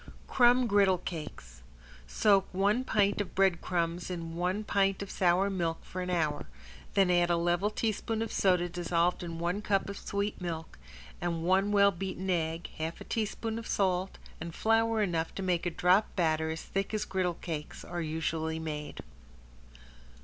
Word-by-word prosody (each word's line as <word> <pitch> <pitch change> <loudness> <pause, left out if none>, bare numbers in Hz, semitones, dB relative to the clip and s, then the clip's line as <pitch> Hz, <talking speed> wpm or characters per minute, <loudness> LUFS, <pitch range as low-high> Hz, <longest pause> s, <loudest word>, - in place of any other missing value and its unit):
~CRUMB 245 0 +4
GRIDDLE 200 -3 +4
CAKES~ 150 - -8 0.5
Soak 195 - +3
one 205 +6 +2
pint 205 -4 +2
of 190 - -6
bread 190 -3 +3
crumbs 170 0 -1
in 165 -2 -5
one 180 +4 -1
pint 195 -1 +1
of 200 - -8
sour 185 +2 +3
milk 170 -4 -2
for 185 - -5
an 180 - -3
hour, 155 -5 0 0.5
then 195 -2 +4
add 175 -1 +3
a 170 - +3
level 175 +4 +1
teaspoon 220 +1 -1
of 225 - -5
soda 180 -2 +2
dissolved 175 0 0
in 170 -2 -5
one 175 +4 -1
cup 200 -2 +1
of 200 - -6
sweet 200 0 -3
milk, 165 -2 -5 0.4
and 170 -2 -2
one 190 +3 +3
well 200 -1 +5
beaten 190 +1 -3
egg, 165 -1 -1
half 160 +1 -3
a - - -8
teaspoon 225 +1 -2
of 230 - -8
salt 190 -1 0 0.2
and 165 0 -6
flour 225 0 +2
enough 165 -4 -1
to 195 - -4
make 180 -2 0
a - - +2
drop 180 +5 +2
batter 160 -3 +1
as 160 0 -4
thick 195 +2 -2
as 210 0 -1
griddle 185 -2 -1
cakes 155 -4 -6
are 175 0 -4
usually 160 0 -2
made. 150 -2 -5
180 Hz, 170 wpm, -30 LUFS, 170-200 Hz, 0.5 s, well